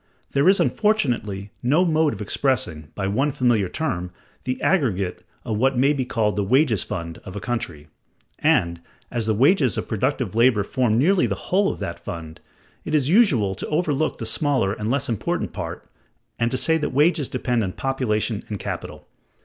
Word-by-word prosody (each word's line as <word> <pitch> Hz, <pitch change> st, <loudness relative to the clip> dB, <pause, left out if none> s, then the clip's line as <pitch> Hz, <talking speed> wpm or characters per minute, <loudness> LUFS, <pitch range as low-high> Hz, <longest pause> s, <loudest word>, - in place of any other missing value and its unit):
There 140 Hz, +6 st, +4 dB
is 195 Hz, -, +4 dB
unfortunately 125 Hz, -, 0 dB
no 150 Hz, +9 st, +3 dB
mode 160 Hz, -2 st, +2 dB
of 105 Hz, -, -5 dB
expressing, 100 Hz, -, -1 dB
by 100 Hz, -, -2 dB
one 115 Hz, +10 st, +1 dB
familiar 120 Hz, -8 st, +1 dB
term, 90 Hz, -, -3 dB, 0.4 s
the 130 Hz, 0 st, -2 dB
aggregate 100 Hz, -, 0 dB, 0.2 s
of 110 Hz, -4 st, -2 dB
what 130 Hz, +1 st, +2 dB
may 140 Hz, +4 st, +4 dB
be 135 Hz, -3 st, -2 dB
called 110 Hz, -4 st, 0 dB
the 100 Hz, -, +1 dB
wages 120 Hz, -, +2 dB
fund 85 Hz, -5 st, -5 dB
of 95 Hz, -, -9 dB
a -, -, -3 dB
country: 85 Hz, -11 st, -4 dB, 0.5 s
and, 85 Hz, 0 st, +2 dB, 0.3 s
as 115 Hz, -2 st, -2 dB
the 110 Hz, -, +2 dB
wages 135 Hz, -, +3 dB
of -, -, -3 dB
productive 125 Hz, -1 st, -1 dB
labor 115 Hz, -2 st, +4 dB
form 115 Hz, 0 st, +1 dB
nearly 175 Hz, +8 st, +3 dB
the -, -, -1 dB
whole 195 Hz, +2 st, +1 dB
of -, -, -7 dB
that 85 Hz, -, -4 dB
fund, 80 Hz, -2 st, -7 dB, 0.4 s
it -, -, -1 dB
is 145 Hz, -2 st, +2 dB
usual 155 Hz, -, +4 dB
to 95 Hz, -, -6 dB
overlook 155 Hz, -1 st, 0 dB
the 115 Hz, -, -5 dB
smaller 130 Hz, -4 st, 0 dB
and 105 Hz, +1 st, -4 dB
less 140 Hz, +2 st, 0 dB
important 115 Hz, -4 st, -2 dB
part, -, -, -6 dB, 0.5 s
and 115 Hz, 0 st, +2 dB
to 130 Hz, -, -1 dB
say 160 Hz, +5 st, +2 dB
that 150 Hz, -, -1 dB
wages 150 Hz, +1 st, +2 dB
depend 125 Hz, -2 st, 0 dB
on 95 Hz, -, -2 dB
population 115 Hz, -5 st, -1 dB
and 105 Hz, -, -3 dB
capital. -, -, -6 dB
125 Hz, 180 wpm, -23 LUFS, 105-145 Hz, 0.5 s, There